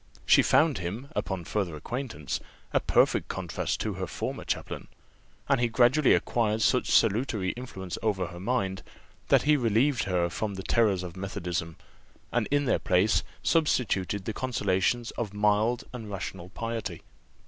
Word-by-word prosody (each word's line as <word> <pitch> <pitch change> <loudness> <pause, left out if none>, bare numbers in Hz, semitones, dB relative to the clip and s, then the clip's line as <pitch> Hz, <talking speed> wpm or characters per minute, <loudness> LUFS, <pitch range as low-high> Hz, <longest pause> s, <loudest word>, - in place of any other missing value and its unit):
She - - +7
found 150 -8 +3
him, 105 +10 -5
upon 95 -3 -2
farther 95 -5 -2
acquaintance, 95 - -4 0.3
a - - +4
perfect - - +2
contrast - - -3
to - - -1
her - - -4
former - - -4
chaplain; - - -4 0.6
and 135 -3 +2
he 120 - +3
gradually 125 +5 +4
acquired 110 -2 0
such 125 - +2
salutary 110 -3 +2
influence 95 -8 -7
over 100 -4 0
her 85 0 -9
mind, 95 -3 -1 0.5
that - - +4
he 150 +1 +4
relieved 120 +1 +2
her 90 -3 +1
from 100 +3 -3
the 95 - -6
terrors 105 -6 +2
of 90 -2 -7
methodism, 90 -4 -4 0.6
and 120 -3 +1
in 145 0 +2
their 125 - +2
place 95 +5 +3 0.2
substituted 100 - +1
the 110 - -2
consolations 115 -1 0
of 105 -4 -3
mild 105 +4 +2
and 115 -4 -7
rational 95 -2 -6
piety. 110 -4 -4
105 Hz, 150 wpm, -28 LUFS, 95-120 Hz, 0.6 s, She